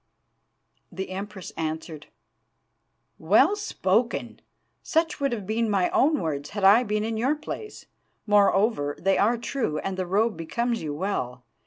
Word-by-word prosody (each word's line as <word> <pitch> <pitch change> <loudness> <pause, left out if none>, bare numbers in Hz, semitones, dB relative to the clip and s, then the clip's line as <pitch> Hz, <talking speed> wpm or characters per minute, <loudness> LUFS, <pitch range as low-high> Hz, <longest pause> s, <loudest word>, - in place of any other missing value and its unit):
"The 190 0 -5
Empress 195 0 -6
answered: 160 -1 -5 1.1
'Well 220 - +4
spoken! 235 - -1 0.4
Such 325 -1 0
would 275 -2 0
have 215 -5 -4
been 220 +2 0
my 190 -3 +1
own 300 +1 +3
words 145 -3 -3
had 205 -1 -5
I 200 +5 +7
been 210 -3 -1
in 225 0 -2
your 260 +7 +1
place. 420 +7 -8 0.4
Moreover, 200 -7 +2
they 195 +1 +2
are 230 +4 +3
true, 235 - -2
and 190 +4 -3
the 185 -1 -2
robe 210 +4 +1
becomes 235 +8 -2
you 150 -2 -4
well. 125 -9 -3
205 Hz, 145 wpm, -25 LUFS, 180-235 Hz, 1.1 s, I